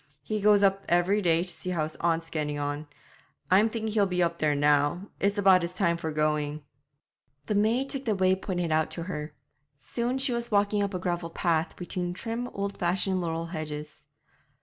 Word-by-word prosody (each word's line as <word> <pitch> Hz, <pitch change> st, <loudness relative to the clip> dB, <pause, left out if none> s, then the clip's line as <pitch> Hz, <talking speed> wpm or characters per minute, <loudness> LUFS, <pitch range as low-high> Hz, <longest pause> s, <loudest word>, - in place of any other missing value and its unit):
He 215 Hz, +7 st, -2 dB
goes 205 Hz, 0 st, +5 dB
up 195 Hz, 0 st, +3 dB
every 175 Hz, +4 st, +3 dB
day 170 Hz, -2 st, +3 dB
to 180 Hz, -1 st, -7 dB
see 185 Hz, -, -6 dB
how 170 Hz, -4 st, 0 dB
his 155 Hz, 0 st, -5 dB
aunt's 165 Hz, -1 st, 0 dB
getting 150 Hz, -2 st, -2 dB
on. 145 Hz, +1 st, -3 dB, 0.6 s
I'm 205 Hz, +4 st, +5 dB
thinking 220 Hz, -1 st, -3 dB
he'll 205 Hz, -2 st, +3 dB
be 180 Hz, -1 st, +1 dB
up 170 Hz, 0 st, -1 dB
there 150 Hz, -1 st, +2 dB
now; 145 Hz, +6 st, +2 dB
it's 200 Hz, +1 st, +1 dB
about 190 Hz, -2 st, +6 dB
his 170 Hz, +1 st, -4 dB
time 170 Hz, -3 st, +2 dB
for 160 Hz, -1 st, -4 dB
going.' 150 Hz, -1 st, 0 dB, 0.8 s
The -, -, -1 dB
maid 225 Hz, +6 st, +2 dB
took 275 Hz, -1 st, -4 dB
the 215 Hz, -3 st, +1 dB
way 185 Hz, 0 st, +3 dB
pointed 180 Hz, -3 st, -3 dB
out 155 Hz, 0 st, +2 dB
to 170 Hz, -, -3 dB
her. 150 Hz, -4 st, -5 dB, 0.4 s
Soon 240 Hz, -, -2 dB
she 265 Hz, -1 st, 0 dB
was 235 Hz, 0 st, -1 dB
walking 205 Hz, 0 st, +2 dB
up 200 Hz, -1 st, -1 dB
a -, -, +1 dB
gravel 175 Hz, -2 st, -2 dB
path, 165 Hz, -1 st, 0 dB
between 180 Hz, 0 st, -4 dB
trim, 230 Hz, +5 st, -4 dB
old 200 Hz, -3 st, -4 dB
fashioned 185 Hz, +1 st, +1 dB
laurel 165 Hz, -1 st, -2 dB
hedges. 150 Hz, -1 st, -6 dB
180 Hz, 195 wpm, -28 LUFS, 160-205 Hz, 0.8 s, about